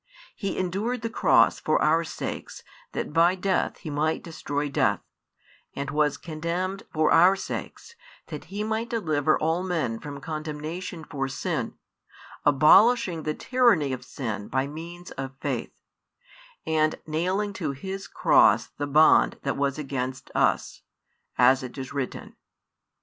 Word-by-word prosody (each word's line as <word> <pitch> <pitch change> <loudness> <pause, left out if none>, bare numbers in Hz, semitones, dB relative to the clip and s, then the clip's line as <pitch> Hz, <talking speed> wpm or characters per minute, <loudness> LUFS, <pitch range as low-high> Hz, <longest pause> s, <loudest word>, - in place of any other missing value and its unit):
He 200 -3 -3
endured 210 +6 -2
the 230 - -2
cross - - +4
for - - +1
our 160 +2 +3
sakes 160 - -6 0.3
that - - -4
by 170 +3 +4
death 190 0 0
He 155 - -7
might 155 +2 0
destroy 145 -3 -3
death, 140 - +1 0.7
and 140 0 -4
was 150 -1 +1
condemned 175 +4 -3
for 155 -1 +2
our 180 +4 +6
sakes 460 - -6 0.3
that - - -8
He 205 +2 -4
might 220 +2 -2
deliver 155 -10 +1
all 160 +3 0
men 160 -12 -2
from 145 -2 -7
condemnation 155 +3 -5
for 135 -4 -3
sin, 135 +1 -3 0.7
abolishing 170 - +5
the 155 0 -2
tyranny 230 - +2
of 130 - -6
sin 110 -6 -5
by 130 0 0
means 170 +4 -9
of 135 0 -6
faith, - - -4 0.9
and 155 -1 +2
nailing 185 +6 -1
to 180 -9 -3
His 190 +7 -6
cross - - +4
the 145 - -1
bond 155 +3 +5
that 140 - -1
was 140 0 -1
against 130 -2 -4
us, - - +1 0.6
as 130 +1 +5
it 130 0 -8
is 130 0 -6
written. 140 -3 -5
155 Hz, 140 wpm, -26 LUFS, 140-185 Hz, 0.9 s, our